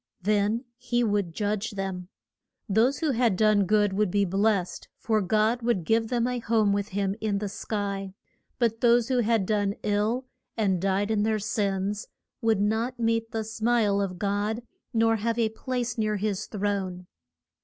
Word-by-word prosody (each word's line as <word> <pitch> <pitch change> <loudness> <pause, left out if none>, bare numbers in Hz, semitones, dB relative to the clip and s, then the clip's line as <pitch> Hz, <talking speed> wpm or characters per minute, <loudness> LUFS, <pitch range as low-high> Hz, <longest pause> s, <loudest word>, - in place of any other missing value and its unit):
Then 210 +4 +1
he 245 -1 0
would 205 -5 0
judge 210 +4 -2
them. 190 -2 -4 0.6
Those 230 - +2
who 315 -3 +2
had 235 -5 +2
done 215 0 +3
good 205 -1 +3
would 205 0 +1
be 200 +2 +2
blest, 195 0 0
for 220 -1 +1
God 215 +5 +1
would 230 -7 0
give 225 +5 +2
them 240 0 0
a 250 0 -1
home 220 -3 +2
with 200 0 -1
him 195 0 -1
in 210 -2 0
the 205 +1 -2
sky; 200 -1 -4 0.4
but 230 -2 0
those 240 0 +4
who 255 -1 +2
had 225 -3 +2
done 205 -1 0
ill, 210 +5 0 0.3
and 190 -5 +1
died 195 +2 +1
in 215 -2 +2
their 220 +1 +1
sins, 200 -1 -1 0.3
would 225 -3 +2
not 225 +4 0
meet 230 0 +1
the 220 0 -2
smile 220 -2 +1
of 185 -2 -3
God, 205 +4 -1 0.3
nor 225 -1 +3
have 230 +2 -1
a 230 -2 +2
place 240 0 -3
near 215 -1 +1
his 205 -1 -2
throne. 195 -3 -2
215 Hz, 170 wpm, -27 LUFS, 200-230 Hz, 0.6 s, those